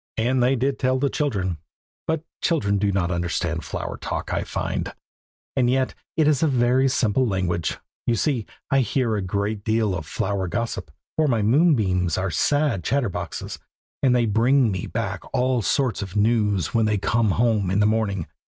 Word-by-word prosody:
And 125 +3 +1
they 125 +2 +3
did 135 +2 -1
tell 130 0 +2
the 140 +1 0
children, 95 - -1 0.5
but 160 -1 -1 0.2
children 100 - +1
do 100 0 +1
not 95 -2 0
understand 85 -1 -1
flower - - -5
talk, - - -4
I - - 0
find. - - -3 0.6
And 125 -3 +3
yet 130 0 +1 0.2
it 155 -2 +4
is 150 -1 +3
a 160 - +4
very 130 0 +3
simple 125 0 +2
language. 90 -4 -1 0.3
You 120 - +3
see, 120 -1 0 0.2
I 135 - +4
hear 125 -2 +1
a 105 - -1
great 100 +2 -2
deal 110 -2 +1
of 80 -5 -5
flower 95 +1 -2
gossip, 95 -1 -3 0.3
for 155 -1 +3
my 115 -6 +1
moonbeams 105 - +3
are 95 -1 -1
sad 140 - +1
chatterboxes, 125 - -2 0.4
and 130 -3 +4
they 120 -1 +3
bring 115 +3 +3
me 95 -2 -3
back 100 -4 -3
all 125 -1 +2
sorts 125 -2 0
of 95 -1 -6
news 105 -5 +1
when 115 -1 +3
they 105 -1 +1
come 110 +2 +1
home 110 -2 +2
in 95 +2 +1
the 105 - +4
morning. 105 -5 0
110 Hz, 180 wpm, -23 LUFS, 95-130 Hz, 0.6 s, it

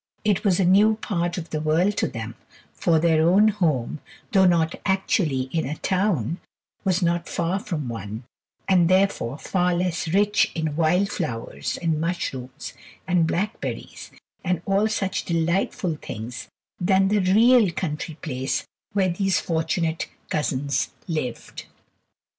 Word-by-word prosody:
It 205 -2 +2
was 195 -4 +2
a 190 - +3
new 205 +4 +5
part 175 -5 -2
of 170 -2 -6
the 155 - -2
world 165 +7 +2
to - - +1
them, 115 0 -6 0.4
for 160 - +2
their 160 -1 +3
own 205 +4 +5
home, 155 - 0 0.3
though 190 -4 +5
not 165 -2 +2
actually 190 - +1
in 160 -4 -1
a 150 +3 -4
town, 180 - 0 0.4
was 185 -1 +1
not 170 0 0
far 175 +3 -1
from 170 - -4
one, 110 0 -6 0.4
and 180 -3 +4
therefore 185 -9 +2
far 180 +1 0
less 175 -1 -1
rich 205 +5 +2
in 160 -2 -2
wild 175 +5 +2
flowers 125 - -3
and 160 -2 +1
mushrooms 135 -6 -4 0.3
and 175 -3 +3
blackberries, 205 +7 -4 0.3
and 180 -2 -1
all 200 +2 +2
such 195 -3 -1
delightful 170 -1 0
things 115 +4 -7 0.3
than 190 +1 +3
the 210 0 +3
real 220 +4 +5
country 160 -1 -4
place 130 -4 -2 0.3
where 195 -2 +2
these 190 +2 +1
fortunate 160 0 -1 0.2
cousins 140 -2 0 0.2
lived. 155 -8 -4
175 Hz, 140 wpm, -24 LUFS, 155-190 Hz, 0.4 s, new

